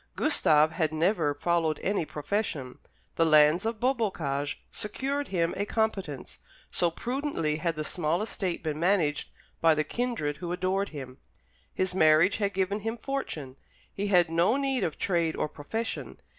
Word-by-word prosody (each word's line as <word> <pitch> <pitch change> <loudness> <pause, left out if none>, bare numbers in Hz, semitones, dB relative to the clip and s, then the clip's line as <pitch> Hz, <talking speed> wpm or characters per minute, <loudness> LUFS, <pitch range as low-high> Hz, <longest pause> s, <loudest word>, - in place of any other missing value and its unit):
Gustave 155 - +4
had 160 -3 0
never 160 -2 +1
followed 165 0 0
any 195 -4 0
profession; 150 -5 -3 0.4
the - - +4
lands 155 +5 +5
of 225 -1 -3
Beaubocage 180 - -1
secured 270 +7 -3
him 170 -3 0
a 205 +2 -2
competence, 195 -11 -2 0.3
so 175 - +2
prudently 240 - -2
had 165 +1 -1
the 155 - -3
small 170 +3 -1
estate 190 -6 -3
been 155 -1 -2
managed 170 -5 +1 0.3
by 165 -1 +5
the 155 - +1
kindred 230 -10 -2
who 175 -1 -5
adored 185 +2 0
him. 135 -4 -8 0.5
His 185 -1 -1
marriage 160 +1 +5
had 200 -2 -1
given 195 +2 0
him 225 +3 -3
fortune. 160 - -5 0.4
He 200 +1 -2
had 175 -4 +4
no 170 +9 +3
need 270 -2 0
of 160 - -2
trade 170 -4 +1
or - - -1
profession. 220 +10 -5
175 Hz, 155 wpm, -28 LUFS, 155-210 Hz, 0.5 s, lands